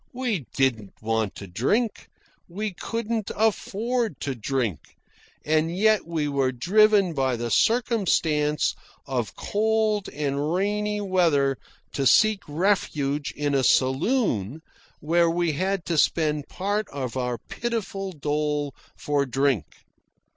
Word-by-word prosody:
We 235 - -2
didn't 120 -7 0
want 110 -2 -1
to 100 - -8
drink. 200 - -1 0.4
We 205 +3 -4
couldn't 225 +2 -3
afford 220 - 0
to 140 - -2
drink. 115 - -3 0.5
And 160 +3 +1
yet 215 -2 +3
we 160 -3 -1
were 135 -2 +1
driven 195 - +3
by 135 -3 0
the 120 0 -4
circumstance 165 - +2 0.3
of 125 -5 -3
cold 215 -1 0
and 145 +1 -2
rainy 210 +2 0
weather 165 -8 +2 0.4
to 135 -2 +1
seek 215 +5 +5
refuge 150 -4 0
in 145 -1 0
a 135 -1 +2
saloon, 135 - +1 0.4
where 170 +2 +3
we 170 0 +1
had 185 +3 -1
to 165 -3 +1
spend 150 -3 +1
part 205 +3 -2
of 130 -4 -5
our 125 -2 -1
pitiful 200 - -4
dole 150 -2 -2 0.2
for 145 -1 -1
drink. 135 - +1
155 Hz, 120 wpm, -25 LUFS, 135-205 Hz, 0.5 s, seek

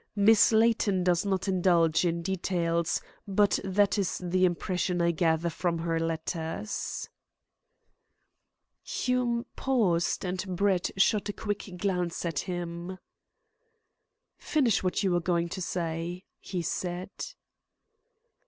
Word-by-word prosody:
Miss 215 +2 +6
Layton 220 -4 +3
does 180 +2 +2
not 190 0 0
indulge 175 -3 +3
in 170 0 -1
details, 170 -2 0 0.3
but 200 +1 +3
that 200 +2 +2
is 190 -3 0
the 185 +1 +1
impression 180 0 -1
I 170 0 +3
gather 165 0 +1
from 170 0 -1
her 165 0 -1
letters." 165 +4 -3 1.7
Hume 245 -2 -1
paused, 195 -11 +1
and 185 +1 -3
Brett 190 -1 +2
shot 205 +2 +3
a - - -2
quick 205 -3 -4
glance 180 -3 -1
at 165 -4 -1
him. 175 0 -5 1.4
"Finish 255 -9 +2
what 185 +2 0
you 190 - +2
were 175 0 +2
going 170 0 0
to 185 +2 -5
say," 170 +1 -3 0.2
he 180 -3 -4
said. 180 +3 -3
180 Hz, 115 wpm, -28 LUFS, 170-200 Hz, 1.7 s, Miss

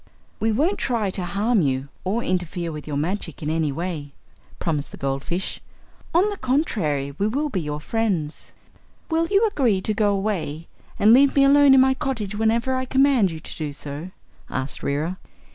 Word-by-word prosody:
"We 220 +1 +1
won't 310 - +1
try 225 -6 0
to 185 - -3
harm 200 +5 +1
you, 135 -2 -1
or 215 +6 -1
to - - -5
interfere 175 -2 -2
with 150 -1 -8
your 145 -2 -2
magic 165 0 -3
in 150 - -1
any 160 -2 0
way," 150 -2 -4 0.4
promised 150 -4 -2
the - - -11
goldfish. 140 +7 -2 0.5
"On 365 +4 +5
the 405 - -5
contrary, 175 - 0
we 200 - +2
will 285 +7 -1
be 190 -9 -2
your 150 -1 -4
friends." 180 -5 -2 0.6
"Will 330 +1 +2
you 405 +4 +3
agree 255 - +1
to 215 - 0
go 205 -1 +2
away 180 -6 -3 0.3
and 215 +2 +6
leave 275 +2 +5
me 275 - +5
alone 280 0 +7
in 260 - +7
my 265 0 +4
cottage, 255 -7 -3
whenever 225 +4 +1
I 260 0 -1
command 265 -6 +3
you 160 -2 -6
to - - -7
do 150 -2 -4
so?" 145 +4 -7 0.4
asked 135 +1 -4
Reera. 155 +6 -2
195 Hz, 185 wpm, -23 LUFS, 155-255 Hz, 0.6 s, alone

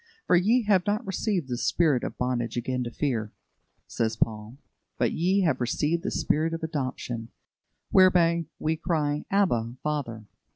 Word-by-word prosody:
"For - - +4
ye 220 +8 +3
have 195 -3 +2
not 210 +4 0
received 190 - -1
the 120 -2 -3
spirit 150 -8 +2
of - - -5
bondage 120 -2 -1
again 125 +1 -1
to - - -3
fear," 115 -5 -2 0.5
says 110 -1 -1
Paul, 110 +2 -2 0.4
"but - - +1
ye 185 +4 +1
have 155 -8 +1
received 150 +7 0
the - - -2
spirit 160 +2 0
of 165 - -8
adoption, 130 -6 -4 0.6
whereby 170 -3 +5
we 160 +1 -1
cry, 150 -3 -1
Abba, 120 - +1
Father. 130 -8 -3
150 Hz, 155 wpm, -27 LUFS, 120-175 Hz, 0.6 s, whereby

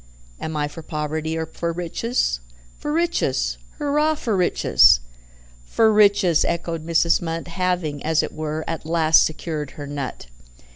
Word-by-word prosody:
Am 160 -1 -4
I 145 -1 0
for 165 +3 -9
poverty 155 +1 -3
or 160 - -2
for 170 +1 -4
riches? 175 - -1 0.4
For 295 - -3
riches. 340 +2 0 0.2
Hurrah 300 +1 +1
for 230 -7 -2
riches!" 180 - +5 0.6
"For 220 - +2
riches!" 200 -5 +4
echoed 170 -1 -2
Mrs. 165 +1 +2
Munt, 165 0 -4
having, 175 -5 -2
as 160 0 +2
it - - -5
were, 155 0 -4
at 165 -2 -4
last 160 0 +4
secured 155 -2 -4
her 145 - -6
nut. 140 - -5
165 Hz, 145 wpm, -22 LUFS, 155-185 Hz, 0.6 s, riches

